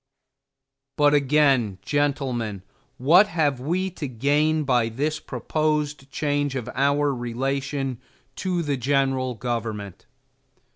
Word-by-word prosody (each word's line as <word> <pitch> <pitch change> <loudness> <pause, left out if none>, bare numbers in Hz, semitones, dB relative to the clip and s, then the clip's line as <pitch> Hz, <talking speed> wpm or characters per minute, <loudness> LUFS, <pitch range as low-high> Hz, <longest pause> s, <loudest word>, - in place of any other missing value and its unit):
But, 145 0 +4
again, 135 -7 +3
gentlemen, 130 -9 -1 0.3
what 170 +11 +6
have 150 -8 0
we 180 +8 -1
to 160 -4 -5
gain 145 +5 +1
by 125 -4 +2
this 150 +7 -2
proposed 150 +1 -2
change 145 -1 -1
of 125 -3 -4
our 140 +1 +2
relation 135 +1 -2 0.4
to 180 -3 -1
the 145 -3 -1
general 130 -1 0
government? 110 -5 -4
140 Hz, 105 wpm, -24 LUFS, 125-150 Hz, 0.4 s, what